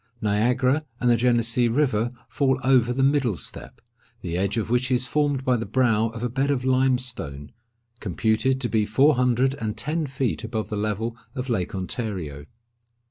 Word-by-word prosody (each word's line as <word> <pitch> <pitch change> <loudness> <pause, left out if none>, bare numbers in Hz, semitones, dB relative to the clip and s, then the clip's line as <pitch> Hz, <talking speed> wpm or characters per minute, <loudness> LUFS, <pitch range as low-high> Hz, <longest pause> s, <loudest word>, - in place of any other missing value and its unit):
Niagara 125 +7 +1 0.2
and 120 0 +3
the - - +5
Genessee 120 0 +2
river 120 -3 +1 0.2
fall 135 -2 +1
over 125 -2 +4
the 135 +2 0
middle 135 - +2
step, - - -9 0.4
the 85 -2 -4
edge 95 +5 0
of 115 0 -2
which 125 +1 +1
is 125 -1 +1
formed 145 -1 0
by 125 - +3
the 115 - -2
brow 115 -1 +2
of 115 +1 -7
a - - +1
bed 135 +4 0
of 130 -3 0
limestone, 125 - 0 0.5
computed 110 +6 0
to 120 - 0
be 110 -2 +1
four 140 +8 +4
hundred 125 +1 +2
and 110 -1 -3
ten 155 +1 -2
feet 130 -3 -2
above 110 -1 -3
the 105 - -3
level 110 +2 -2 0.2
of 125 0 -4
Lake 95 -5 -1
Ontario. 90 - -4
120 Hz, 175 wpm, -24 LUFS, 110-130 Hz, 0.5 s, the